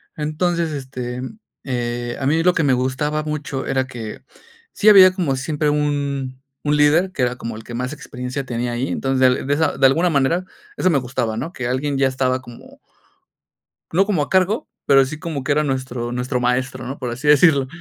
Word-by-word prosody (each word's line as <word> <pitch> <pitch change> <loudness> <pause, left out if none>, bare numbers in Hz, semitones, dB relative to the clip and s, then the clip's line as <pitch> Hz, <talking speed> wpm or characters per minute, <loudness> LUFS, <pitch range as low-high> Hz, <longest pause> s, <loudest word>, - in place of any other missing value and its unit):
Entonces, 165 +2 -1
este, 130 -3 -5 0.4
eh, 120 -2 -3
a - - -1
mí 155 +4 +2
lo 180 +2 +4
que 165 - +1
me 140 - +3
gustaba 130 +4 0
mucho 150 -3 -4
era 130 -1 0
que 120 -4 -8 0.5
sí 215 - -1
había 190 -3 +9
como 170 -8 -1
siempre 150 +3 -1
un 140 -3 -2 0.2
un 150 0 +1
líder 155 +6 +3
que 145 - -4
era 125 0 +1
como 115 -2 -6
el 110 - -10
que 120 - -8
más 125 +4 -3
experiencia 135 -3 -6
tenía 120 -1 -3
ahí. 120 +3 -2
Entonces, 130 -2 +1
de 140 - +2
esa 160 +2 0
de 135 - +4
alguna 165 +7 +4
manera, 160 +4 +1 0.3
eso 185 - +2
me 160 - +3
gustaba, 125 -3 -3
¿no? 160 +8 -4
Que 125 -7 -4
alguien 135 +3 -1
ya 135 - +4
estaba 130 -1 0
como. 120 -2 -14 1.1
No 195 +4 +3
como 185 -8 +1
a - - -4
cargo, 190 +4 +1 0.2
pero 135 -1 +6
sí 150 +3 -6
como 155 -4 -4
que 140 +3 0
era 150 +1 +2
nuestro 130 -3 -3
nuestro 125 +1 -2
maestro, 130 +1 -1
¿no? 135 +3 -6
Por 125 -2 -4
así 125 +5 -6
decirlo. 145 -2 +5
135 Hz, 200 wpm, -20 LUFS, 125-150 Hz, 1.1 s, había